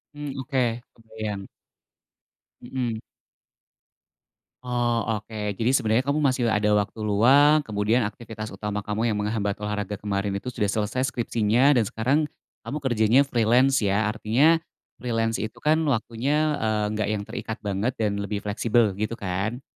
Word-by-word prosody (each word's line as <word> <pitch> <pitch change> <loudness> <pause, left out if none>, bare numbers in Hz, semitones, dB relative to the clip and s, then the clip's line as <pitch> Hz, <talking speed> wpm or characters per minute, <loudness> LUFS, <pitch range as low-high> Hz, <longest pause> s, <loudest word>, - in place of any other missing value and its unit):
Mmm, 145 -1 -5
oke 125 -3 -1
kebayang. 110 -3 -6 1.1
Mhm. 120 -3 -3 1.7
Oh 120 -3 0
oke 105 -1 -4
jadi 115 +5 0
sebenernya 115 -3 +3
kamu 140 +3 -1
masih 130 -5 +2
ada 105 -1 +2
waktu 105 +2 0
luang 135 +9 +5
kemudian 110 0 0
aktivitas 110 0 -8
utama 105 +1 -4
kamu 105 +2 -2
yang - - -2
menghambat 105 -1 -1
olahraga 105 -1 -3
kemarin 100 -1 -1
itu 100 +6 -4
sudah 115 -4 -1
selesai 105 +5 -1
skripsinya 120 +4 +2
dan 115 - +3
sekarang, 125 +9 +1 0.5
kamu 145 - -3
kerjanya 120 0 +4
freelance 125 +1 +3
ya? 105 +1 +1
Artinya, 125 +10 +3 0.4
freelance 115 -2 -1
itu 110 0 -4
kan? 155 +1 +3
Waktunya, 140 +5 0
eee, 110 -1 0
enggak 105 -1 -1
yang 105 -1 -1
terikat 110 +1 -6
banget 100 +5 -1
dan 105 -2 -1
lebih 100 0 -3
fleksibel 110 +1 +2
gitu 110 +2 -2
kan? 100 +5 -3
110 Hz, 140 wpm, -25 LUFS, 105-125 Hz, 1.7 s, luang